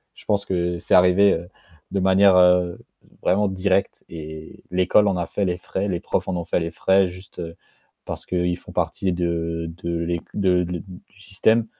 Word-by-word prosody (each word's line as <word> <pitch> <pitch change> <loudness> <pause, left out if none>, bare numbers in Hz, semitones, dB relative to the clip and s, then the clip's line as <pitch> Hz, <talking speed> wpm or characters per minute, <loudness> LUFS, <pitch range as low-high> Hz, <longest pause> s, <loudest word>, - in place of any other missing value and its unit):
je - - -17
pense 100 -1 0
que 90 -1 -1
c'est - - 0
arrivé, 90 +2 +6
heu, 85 +1 -5 0.4
de 100 - -1
manière, 95 +1 +5
heu, 90 -1 +4 0.4
vraiment 100 +3 +2
directe 95 +1 -1
et 80 -1 -9
l'école 95 +3 +3
en 95 - 0
a 85 - -2
fait 100 - -2
les 90 - -1
frais, 95 +2 -3
les 90 -3 -2
profs - - -2
en 90 - -1
ont 85 - -3
fait 85 - 0
les 85 0 -3
frais 95 +3 +2
juste 90 +1 -11 0.6
parce - - -7
qu'ils 90 -1 -1
font - - -13
partie 95 -2 -1
de 85 -1 -2 0.2
de 85 0 -2
l'éc 85 0 -2
de 90 -3 +2
le 90 -1 -4
du 95 +1 -15
système, 110 +4 +1
90 Hz, 190 wpm, -22 LUFS, 85-95 Hz, 0.6 s, arrivé